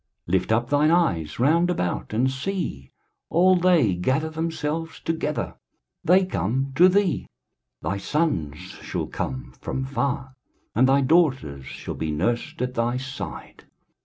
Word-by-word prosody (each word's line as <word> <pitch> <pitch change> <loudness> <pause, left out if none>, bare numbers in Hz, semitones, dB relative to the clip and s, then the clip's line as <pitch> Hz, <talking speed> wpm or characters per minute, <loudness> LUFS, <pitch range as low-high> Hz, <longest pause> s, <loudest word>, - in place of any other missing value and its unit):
23:060:004 85 - -4
Lift 95 +3 +2
up 120 +2 +2
thine 145 +1 +4
eyes 85 - +1
round 165 +7 +3
about, 90 - -2
and 125 +5 +2
see: 135 - -4 0.4
all 185 +3 +5
they 175 - +4
gather 130 - 0
themselves 160 0 -3
together, 160 -2 -2 0.5
they 185 +3 +5
come 130 - -1
to 180 +6 +7
thee: 195 -1 +1 0.6
thy 95 +6 -1
sons 100 - -1
shall - - -5
come 65 -1 -5
from 130 - -3
far, 135 -1 -2 0.4
and 130 +3 +4
thy 140 +1 +5
daughters 130 - +2
shall - - -6
be 80 - -3
nursed 115 +11 -1
at 125 0 -2
thy 120 +1 0
side. 130 +1 -7
135 Hz, 140 wpm, -24 LUFS, 100-165 Hz, 0.6 s, to